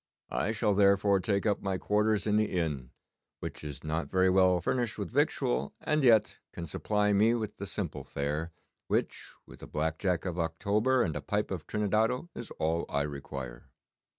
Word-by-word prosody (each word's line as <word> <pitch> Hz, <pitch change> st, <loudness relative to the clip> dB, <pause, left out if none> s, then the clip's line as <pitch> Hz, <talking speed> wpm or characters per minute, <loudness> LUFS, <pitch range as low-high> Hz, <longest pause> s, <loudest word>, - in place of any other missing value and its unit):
I 110 Hz, -, 0 dB
shall 110 Hz, -1 st, +1 dB
therefore 100 Hz, 0 st, +4 dB
take 100 Hz, +1 st, 0 dB
up 105 Hz, -2 st, +1 dB
my 95 Hz, -1 st, -1 dB
quarters 105 Hz, +2 st, +1 dB
in 105 Hz, -1 st, +2 dB
the 110 Hz, 0 st, +1 dB
inn, 75 Hz, -8 st, -2 dB, 0.5 s
which -, -, -6 dB
is 70 Hz, -3 st, -7 dB
not 80 Hz, +2 st, -2 dB
very 95 Hz, 0 st, +3 dB
well 90 Hz, -1 st, +4 dB
furnished 115 Hz, +5 st, -1 dB
with 100 Hz, -6 st, -4 dB
victual, 65 Hz, +3 st, 0 dB
and 155 Hz, -2 st, 0 dB
yet 110 Hz, -4 st, +4 dB
can 85 Hz, -, -5 dB
supply 105 Hz, +6 st, 0 dB
me 110 Hz, +4 st, +4 dB
with 110 Hz, -3 st, -4 dB
the -, -, -5 dB
simple -, -, -4 dB
fare, 75 Hz, +4 st, -3 dB, 0.4 s
which -, -, -2 dB
with -, -, -14 dB
a -, -, -8 dB
black 80 Hz, +1 st, -2 dB
Jack 90 Hz, -3 st, 0 dB
of 90 Hz, -1 st, -3 dB
October 105 Hz, +10 st, +1 dB
and 80 Hz, -, -2 dB
a -, -, -3 dB
pipe -, -, -1 dB
of -, -, -4 dB
Trinidado 110 Hz, -, 0 dB
is 120 Hz, -, -7 dB
all 80 Hz, +1 st, 0 dB
I 70 Hz, 0 st, +1 dB
require. 70 Hz, -4 st, -7 dB
95 Hz, 180 wpm, -30 LUFS, 80-105 Hz, 0.5 s, therefore